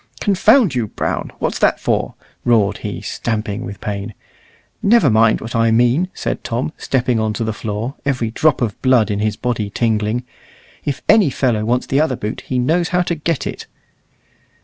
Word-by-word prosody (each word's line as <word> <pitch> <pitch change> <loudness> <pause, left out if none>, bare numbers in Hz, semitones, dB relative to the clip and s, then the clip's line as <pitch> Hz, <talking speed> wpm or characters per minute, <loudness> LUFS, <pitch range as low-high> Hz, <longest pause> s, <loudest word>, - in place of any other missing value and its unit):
"Confound 210 - +4
you, 120 -4 -1
Brown! - - -3
what's - - -2
that - - +3
for?" - - -1 0.3
roared 110 -4 +2
he, - - -5
stamping 110 -1 -3
with 100 -4 -7
pain. 100 +1 -5 0.7
"Never 200 - +4
mind 110 0 +4
what 115 +1 -6
I 115 0 +3
mean," 120 +10 +3
said - - -3
Tom, 125 +6 -2
stepping 125 -3 0
on 110 -1 0
to 115 - -2
the 110 -1 -2
floor, 110 +4 -4
every 125 -5 -1
drop 150 +2 +2
of 105 -4 -3
blood 125 -5 +3
in 100 - -1
his 105 0 0
body 110 -3 -2
tingling; 110 +2 0 0.6
"if 145 -1 -3
any 210 -7 +5
fellow 120 -5 0
wants 125 +2 +1
the 135 +2 +1
other 155 -5 +1
boot, 110 -2 -5
he 130 - -1
knows 160 +8 +1
how 180 0 +2
to 175 - -1
get 165 -1 -2
it." - - -6
120 Hz, 180 wpm, -18 LUFS, 110-140 Hz, 0.7 s, any